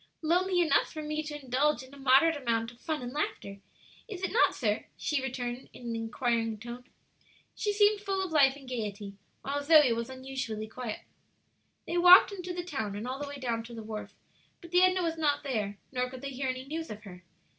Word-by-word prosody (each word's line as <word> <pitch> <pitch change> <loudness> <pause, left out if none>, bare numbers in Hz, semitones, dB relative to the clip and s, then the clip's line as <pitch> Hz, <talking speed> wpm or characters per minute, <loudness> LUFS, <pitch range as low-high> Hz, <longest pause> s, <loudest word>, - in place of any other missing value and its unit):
"Lonely 355 +3 +2
enough 315 -5 +2
for 310 -1 -6
me 305 0 -2
to 300 -1 -6
indulge 265 +1 +1
in 260 +1 -15
a 280 - -12
moderate 275 +5 +5
amount 230 -4 -1
of 240 - -20
fun 310 -5 -3
and 245 +1 -6
laughter, 200 -9 -3 0.5
is 390 -4 -7
it 380 - -1
not, 465 - +4
sir?" 215 -4 -1
she 300 -3 -1
returned, 250 -1 -4
in - - -12
an 230 - -2
inquiring 225 -1 -1
tone. 240 +3 -8 0.7
She 415 - -1
seemed 410 0 +3
full 390 -2 -1
of 360 - -7
life 275 -4 +5
and 275 -2 -13
gayety, 210 -5 -4 0.3
while 285 +1 -2
Zoe 295 -4 +6
was 230 +1 -3
unusually 260 -5 -5
quiet. 225 -1 -6 0.8
They 345 - 0
walked 360 +3 +9
into 365 -2 -6
the 355 0 -4
town 220 - -4
and 215 +4 -5
all 260 +2 -4
the 290 - -4
way 285 0 -7
down 235 -4 -2
to 235 0 -10
the 225 - -7
wharf; 215 -1 -7 0.4
but 340 -3 -13
the 360 0 +5
Edna 370 0 +4
was 330 -1 -2
not 295 -2 +1
there, 215 -7 -2
nor 250 -1 -1
could 255 0 -9
they 280 0 -5
hear 265 0 -2
any 255 0 -4
news 320 +3 -5
of 210 0 -8
her. 185 -3 -11
265 Hz, 215 wpm, -30 LUFS, 235-320 Hz, 0.8 s, walked